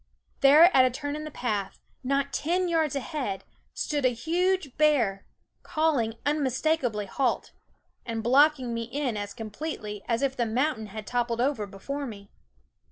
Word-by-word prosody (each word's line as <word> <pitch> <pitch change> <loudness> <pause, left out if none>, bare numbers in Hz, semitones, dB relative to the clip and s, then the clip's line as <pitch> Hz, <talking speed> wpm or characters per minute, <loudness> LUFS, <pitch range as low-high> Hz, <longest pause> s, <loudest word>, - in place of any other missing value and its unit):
There 305 +6 +7
at 260 - +8
a 255 - +4
turn 285 +3 -4
in 305 0 -5
the - - -5
path, 215 -8 -3 0.2
not 275 +1 0
ten 360 +4 0
yards 320 -4 +1
ahead, 270 - -3 0.3
stood 290 -2 -1
a 255 - +5
huge 345 +2 0
bear, 245 -11 +2 0.3
call 310 -3 +1
ing 225 -1 -2
unmistakable 275 -5 0
halt, 260 +5 -1 0.5
and 225 -1 -4
blocking 260 0 +4
me 230 - -2
in 255 0 -2
as 205 -1 -5
completely 215 -2 -5
as 235 +3 0
if 270 -1 0
the 235 -3 0
mountain 235 -1 0
had 215 +1 -8
toppled 240 0 -1
over 250 -5 0
before 275 +9 -5
me. 200 -3 -10
260 Hz, 160 wpm, -27 LUFS, 225-300 Hz, 0.5 s, at